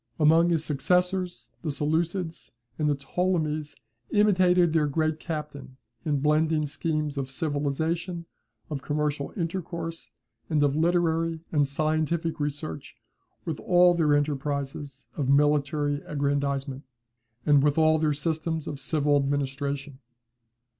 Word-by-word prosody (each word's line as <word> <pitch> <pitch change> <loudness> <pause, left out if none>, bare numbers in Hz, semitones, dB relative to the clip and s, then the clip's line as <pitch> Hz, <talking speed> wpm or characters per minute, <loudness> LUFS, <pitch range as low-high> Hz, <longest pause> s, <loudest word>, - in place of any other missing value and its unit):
Among 165 +3 +5
his 160 -2 +1
successors, 180 +5 0
the 160 - -3
Seleucids 160 +4 -1 0.3
and 150 -1 +2
the 145 - +2
Ptolemies 155 0 -1 0.3
imitated 185 -5 +4
their 155 -2 +3
great 155 +2 0
captain 150 -5 -6 0.3
in 145 -4 0
blending 155 +1 +2
schemes 150 -1 -2
of 135 -1 -3
civilization, 160 +4 -2 0.5
of 140 -3 -3
commercial 150 0 -1
intercourse, 170 -1 -4 0.4
and 150 -3 +2
of 140 -1 +2
literary 165 0 +1
and 145 -3 +3
scientific 155 +3 0
research 145 - -4 0.5
with 160 -3 -3
all 180 0 +5
their 155 -4 +3
enterprises 140 -1 -2
of 135 -4 -1
military 145 0 +2
aggrandizement, 140 -2 -1 0.6
and 145 -2 +5
with 145 +1 +2
all 160 0 +4
their 155 -1 +2
systems 160 +1 -2
of 140 - -5
civil 145 -1 +2
administration. 140 0 -2
150 Hz, 120 wpm, -27 LUFS, 145-165 Hz, 0.6 s, Among